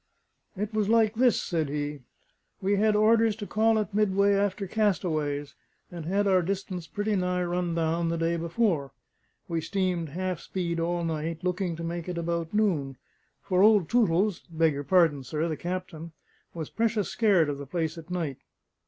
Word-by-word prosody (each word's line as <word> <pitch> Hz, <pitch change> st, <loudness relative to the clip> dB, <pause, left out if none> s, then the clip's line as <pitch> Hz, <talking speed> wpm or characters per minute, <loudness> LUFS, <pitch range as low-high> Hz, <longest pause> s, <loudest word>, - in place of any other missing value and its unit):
"It 210 Hz, +2 st, -3 dB
was 215 Hz, -1 st, 0 dB
like 225 Hz, -2 st, +4 dB
this," 245 Hz, +1 st, +3 dB
said 160 Hz, -4 st, -1 dB
he. 145 Hz, 0 st, -3 dB, 0.6 s
"We 200 Hz, +1 st, +1 dB
had 215 Hz, +1 st, +3 dB
orders 220 Hz, 0 st, +4 dB
to 210 Hz, -1 st, -6 dB
call 220 Hz, +2 st, +2 dB
at 215 Hz, -1 st, -2 dB
Midway 200 Hz, -1 st, +3 dB
after 200 Hz, 0 st, 0 dB
castaways, 160 Hz, -9 st, -1 dB, 0.4 s
and 170 Hz, -3 st, -7 dB
had 200 Hz, +3 st, +1 dB
our 190 Hz, -2 st, +4 dB
distance 185 Hz, -2 st, -4 dB
pretty 205 Hz, +4 st, -1 dB
nigh 180 Hz, -1 st, 0 dB
run 175 Hz, -1 st, -1 dB
down 165 Hz, +1 st, 0 dB
the 170 Hz, -, -1 dB
day 165 Hz, +1 st, 0 dB
before. 170 Hz, -4 st, 0 dB, 0.5 s
We 165 Hz, -2 st, -1 dB
steamed 180 Hz, -3 st, -1 dB
half 185 Hz, +2 st, -3 dB
speed 170 Hz, -3 st, -3 dB
all 170 Hz, +1 st, -1 dB
night, 165 Hz, +1 st, -3 dB
looking 180 Hz, -1 st, -1 dB
to 165 Hz, -, -7 dB
make 170 Hz, +1 st, -4 dB
it 175 Hz, -, -4 dB
about 170 Hz, -1 st, -2 dB
noon; 165 Hz, -11 st, 0 dB, 0.5 s
for 185 Hz, -1 st, +1 dB
old 205 Hz, -5 st, +5 dB
Tootles 205 Hz, -4 st, +2 dB
beg 160 Hz, -1 st, +2 dB
your 140 Hz, +1 st, -4 dB
pardon, 160 Hz, -4 st, +3 dB
sir 155 Hz, +5 st, -2 dB
the 160 Hz, -, -2 dB
captain 170 Hz, -2 st, -5 dB, 0.4 s
was 160 Hz, -3 st, -6 dB
precious 225 Hz, -3 st, 0 dB
scared 200 Hz, -9 st, +3 dB
of 145 Hz, -1 st, -3 dB
the 140 Hz, -, -7 dB
place 160 Hz, +1 st, -2 dB
at 165 Hz, 0 st, -11 dB
night. 165 Hz, -7 st, -3 dB
175 Hz, 175 wpm, -27 LUFS, 165-205 Hz, 0.6 s, old